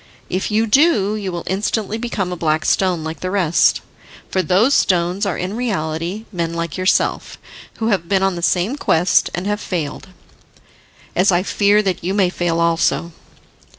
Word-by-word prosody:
If 185 - -1
you 220 +1 +2
do, 225 - +3
you 200 -3 -4
will 170 -1 -5
instantly 210 +3 -2
become 215 -6 -3
a - - -3
black 155 -2 0
stone 180 -4 +1
like 160 +1 -5
the 185 - -3
rest. 180 -4 +2 0.5
For 190 - +1
those 190 - +3
stones 180 +1 +1
are 195 - -2
in 185 +3 -4
reality 185 -3 -3
men 170 -3 -3
like 170 -2 -3
yourself, 185 0 0 0.4
who 225 0 -1
have 185 -5 -1
been 195 -1 +2
on 195 -1 +1
the 170 - -5
same 185 +9 +1
quest, 175 - +2
and 175 - -4
have 210 0 -1
failed, 165 -1 -4 1.1
as 190 +2 +3
I 175 0 +2
fear 205 +1 +2
that 190 -4 -2
you 190 +3 -1
may 190 -3 +2
fail 170 -2 -1
also. 170 0 +1
185 Hz, 175 wpm, -19 LUFS, 170-205 Hz, 1.1 s, do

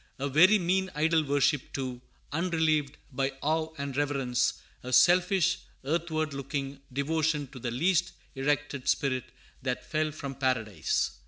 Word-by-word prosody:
A 140 - -2
very 175 +10 +6
mean 190 +1 +1
idol 160 +1 +3
worship, 145 -1 +1
too, 130 -2 -4 0.3
unrelieved 155 -3 +1
by 135 +1 -1
awe 160 +2 0
and 140 -2 -4
reverence, 135 -4 +1 0.3
a 125 - -6
selfish, 180 +3 +4 0.3
earthward 155 0 -1
looking 140 0 -4
devotion 150 +2 0
to 130 - -9
the 120 - -3
"least 170 +8 +1 0.2
erected 140 -1 -1
spirit 130 -3 +1 0.4
that 125 -1 -3
fell 155 -1 0
from 140 -2 -6
paradise." 115 - 0
145 Hz, 135 wpm, -29 LUFS, 135-160 Hz, 0.4 s, very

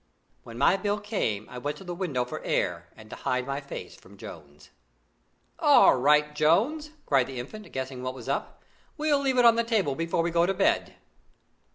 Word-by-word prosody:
When 115 0 -11
my 155 +8 +4
bill 205 +1 -1
came, 155 - -2
I 125 - -8
went 145 +3 -4
to - - -11
the 180 -1 -5
window 160 -9 -2
for 125 - -7
air 85 -1 -1
and 110 -1 -14
to - - -6
hide 125 0 -1
my 140 +1 -3
face 140 - -8
from - - -18
Jones. - - -12 0.9
"All 295 -4 +6
right, 150 +3 +3
Jones!" 215 - +2 0.2
cried 135 -3 +2
the 130 -2 -6
Infant, 210 - -9
guessing 130 -1 -5
what 130 0 -4
was 125 -2 -10
up. 140 - -4 0.3
"We'll 300 -2 +2
leave 270 -2 0
it 245 - +5
on 230 -1 +6
the 235 - +2
table 215 - 0
before 165 +2 -1
we 170 - -1
go 170 +1 +3
to 195 - 0
bed." - - +1
150 Hz, 200 wpm, -27 LUFS, 130-210 Hz, 0.9 s, All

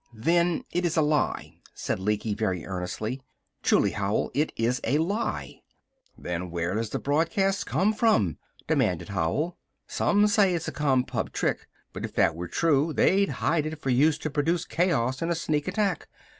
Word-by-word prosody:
"Then 170 +8 +1
it 175 - -1
is 170 -1 0
a 160 - +5
lie," 150 -1 -1 0.2
said - - -2
Lecky, 105 +2 -1
very 95 -6 -2
earnestly. 100 +7 -4 0.4
"Truly, - - +3
Howell, 100 +1 -1
it 150 +2 0
is 120 +3 0
a 145 - +2
lie!" 205 +7 -2 0.6
"Then 90 +1 -4
where 85 +1 -2
does 110 +1 -2
the - - -2
broadcast 195 +7 0
come 210 +3 +2
from?" 215 - +2 0.3
demanded 90 -2 0
Howell. 100 - -1 0.3
"Some 205 0 +2
say 205 -3 +3
it's 165 - -3
a - - -2
Compub 130 -4 0
trick. - - -1 0.3
But - - -6
if - - -6
they - - +5
were 85 +2 -6
true 155 - +1
they'd 195 +5 +3
hide 155 -1 0
it 155 0 -6
for 135 - -1
use 150 +5 +4
to 155 - -1
produce 160 +4 0
chaos 135 -8 0
in 165 - -1
a 170 - +1
sneak 150 -1 -1
attack. 195 -3 -1
150 Hz, 170 wpm, -26 LUFS, 110-175 Hz, 0.6 s, a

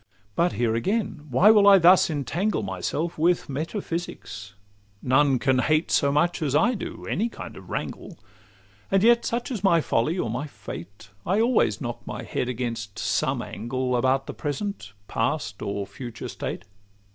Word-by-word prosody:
But 175 +1 +2
here 115 -2 +1
again, 170 - -1
why 175 - +6
will 205 -2 +6
I 200 -1 +9
thus 180 +1 +6
entangle 160 - -1
Myself 100 - -3
with 170 +2 +2
metaphysics? 155 - -5 0.5
None 135 +1 +4
can 130 0 +2
hate 155 +4 +1
So 140 - +3
much 170 +5 +1
as 145 -3 0
I 230 +11 +4
do 220 - -6
any 225 +5 0
kind - - -9
of - - -12
wrangle; - - -5 0.7
And 195 0 +3
yet, 235 +1 +5
such 240 +3 -2
is 215 -6 -4
my 170 -4 +5
folly, 155 +3 0
or 145 - -1
my 125 +7 -3
fate, 100 - -10
I 195 +4 +1
always 225 - +2
knock 120 0 -4
my 120 - -5
head 125 +2 -2
against 115 -4 -4
some - - 0
angle 125 +3 -2
About 130 +2 +2
the - - -6
present, 145 - -4
past, 110 -4 -2
or 100 -1 -3
future 110 +4 -8
state. - - -5
140 Hz, 165 wpm, -25 LUFS, 115-180 Hz, 0.7 s, I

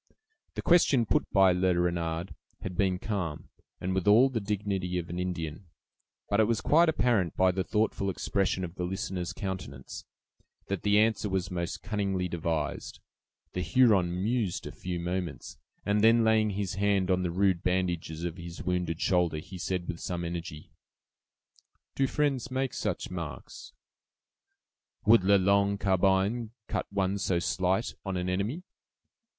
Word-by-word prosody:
The - - -4
question 145 -8 +4
put - - 0
by 95 -1 +5
Le 90 0 +2
Renard 85 0 -1 0.3
had 90 - -5
been 95 0 +1
calm, 90 -7 -4 0.3
and 95 +1 -2
with 95 +1 -1
all 115 +6 +7
the 125 -3 -2
dignity 100 -3 -2
of 85 -1 -4
an 90 - -4
Indian; 90 -1 -4 0.6
but 100 - +1
it 110 - +6
was 115 0 +1
quite 165 +2 +4
apparent, 115 - +1
by 95 0 +4
the 95 +1 -1
thoughtful 105 -2 0
expression 95 0 -1
of 85 -2 -5
the 90 - -4
listener's 90 -1 -3
countenance, 95 - -6 0.6
that 100 -3 -2
the 105 0 +3
answer 110 -1 +2
was 95 0 -2
most 85 -1 -4
cunningly 100 -3 -1
devised. 80 -3 -3 0.5
The 90 - -2
Huron 90 -2 +3
mused 110 -4 -1
a - - -6
few 90 -1 -5
moments, 85 -6 -4 0.3
and 105 0 +2
then 115 +1 +6
laying 110 -1 +3
his 100 -1 -2
hand 100 -1 +1
on 90 0 +2
the 90 - -1
rude 95 0 +1
bandages 90 -3 -1
of 85 0 -3
his 85 -1 -8
wounded 90 -2 -1
shoulder, 90 -4 +2
he 90 +4 -8
said, 90 +1 -2
with 85 -2 -4
some 85 -1 -3
energy: 85 -2 -6 1.2
"Do 135 - +1
friends 135 -3 0
make 130 0 -1
such - - -3
marks?" 85 -4 -7 1.3
"Would 110 -2 +6
'La 100 +2 +5
Longue 100 +1 +3
Carbine' 100 +4 +1 0.2
cut - - -3
one 100 0 0
so 95 -2 +1
slight 95 +4 0
on 95 -2 -3
an 90 0 -2
enemy?" 105 - -2
95 Hz, 155 wpm, -29 LUFS, 90-105 Hz, 1.3 s, all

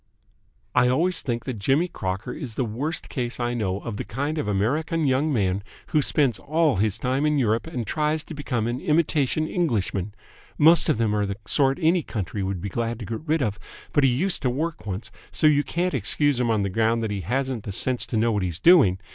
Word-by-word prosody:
" - - -42 0.3
I 125 0 +4
always 165 +9 +2
think 120 -2 -3
that 125 -5 -4
Jimmy 135 - +2
Crocker 100 - -4
is 125 -8 -7
the 130 - 0
worst 135 +9 -3
case 125 -2 -4
I 120 0 -1
know 100 -4 -2
of 115 -4 -5
the - - -3
kind 145 +7 -3
of 110 - -2
American 150 +11 0
young 140 +3 +2
man 100 -5 0 0.3
who 155 - +3
spends 140 -4 +2
all 155 - +1
his 105 0 +1
time 130 +3 -1
in 150 -1 +2
Europe 115 0 +1
and 125 -8 -4
tries 150 +3 -1
to - - -9
become 125 -6 -2
an 120 +2 -2
imitation 155 -1 +1
Englishman. 105 - -1 0.4
Most 165 +2 +5
of - - +2
them 110 -2 +1
are 105 -1 0
the 100 0 -4
sort 135 +5 +2
any 170 +1 +3
country 105 - -4
would 95 -2 -3
be 100 - -3
glad 115 +3 -2
to 110 - -7
get 110 +5 -5
rid 155 -1 +2
of, 105 -3 -2 0.3
but 145 - +3
he 135 - +5
used 170 +10 0
to 130 - +1
work 150 0 -3
once, 95 +3 -5 0.2
so - - -1
you 145 -1 +5
can't 175 +3 -1
excuse 135 +3 +1
him 120 -2 +1
on 110 -3 +1
the 100 - -1
ground 115 +2 +1
that 110 - -2
he 100 -2 -3
hasn't 130 +2 -2
the 100 - -4
sense 125 +5 +1
to 115 - -2
know 115 +2 +2
what 105 -2 0
he's 90 -3 -2
doing. 130 - +6
125 Hz, 230 wpm, -24 LUFS, 105-150 Hz, 0.4 s, doing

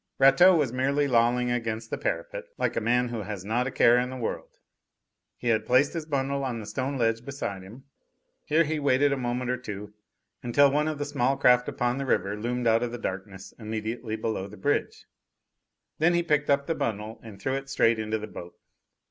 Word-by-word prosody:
Rateau 135 +8 +7
was 140 -7 +1
merely 140 +3 +1
lolling 120 0 +2
against 115 -2 -3
the - - -1
parapet, - - -3
like - - -1
a - - 0
man 125 +2 +1
who 115 -2 -4
has 100 -2 -6
not 120 +4 0
a - - -3
care 120 0 +5
in 125 0 -1
the 130 - -6
world. 120 - -4 0.9
He 120 - -2
had 110 -1 +1
placed 130 +3 +3
his 165 -2 -5
bundle 140 -1 -1
on 125 -3 -3
the 110 - -7
stone 135 +5 -3
ledge 115 -1 0
beside 130 -9 -5
him. 110 +8 -13 0.6
Here 160 +2 +3
he 155 0 -2
waited 140 0 +3
a - - +1
moment 125 -1 -2
or 125 - -1
two, 105 -4 -8 0.5
until 140 +4 +4
one 150 +2 +1
of 155 -1 -2
the 145 - -3
small 135 -2 0
craft 125 0 +4
upon 120 +2 -1
the 135 - -3
river 100 -3 +1
loomed 120 +3 -3
out 115 0 +4
of 120 -1 -2
the 120 - -5
darkness 95 -3 -6
immediately 110 +1 -4
below 110 -3 -3
the 105 +1 -12
bridge. 145 0 -1 0.9
Then 170 +3 +3
he 175 - +2
picked 150 -3 +1
up 140 0 +3
the 165 - 0
bundle 110 -5 -4
and 110 -4 -11
threw 130 +7 -2
it 135 0 -4
straight 115 -4 +2
into 110 0 -1
the 105 - -6
boat. 90 -4 -10
125 Hz, 210 wpm, -27 LUFS, 110-140 Hz, 0.9 s, Rateau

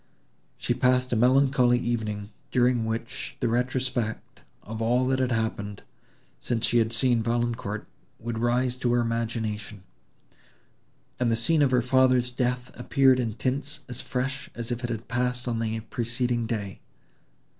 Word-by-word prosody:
She - - 0
passed 125 0 +2
a - - +3
melancholy 125 +1 +4
evening, 110 -4 -2 0.2
during 125 -2 +2
which 115 +1 -4
the 125 - +1
retrospect 125 -1 -1 0.2
of 110 +2 -6
all 120 +3 +2
that 130 0 +1
had 130 -1 +1
happened, 105 -3 -2 0.6
since 120 -1 0
she 120 - +3
had 110 0 +1
seen 120 0 +3
Valancourt, 115 -2 -1 0.3
would 115 0 -4
rise 120 +1 +1
to 120 -1 +1
her 120 - +3
imagination; 110 -3 -3 1.4
and 120 -2 +2
the - - +3
scene 145 +8 +2
of 140 - +5
her 125 -2 +2
father's 130 -1 +3
death 125 0 -1
appeared 130 +1 +3
in 115 -3 -1
tints 140 +5 -2
as 125 - -6
fresh, 135 +1 -3
as 120 0 -4
if 120 +1 -3
it 120 - -2
had 115 0 -4
passed 125 0 -1
on 115 -2 -1
the 110 0 -2
preceding 120 +1 -1
day. 100 -4 -3
120 Hz, 155 wpm, -26 LUFS, 115-125 Hz, 1.4 s, of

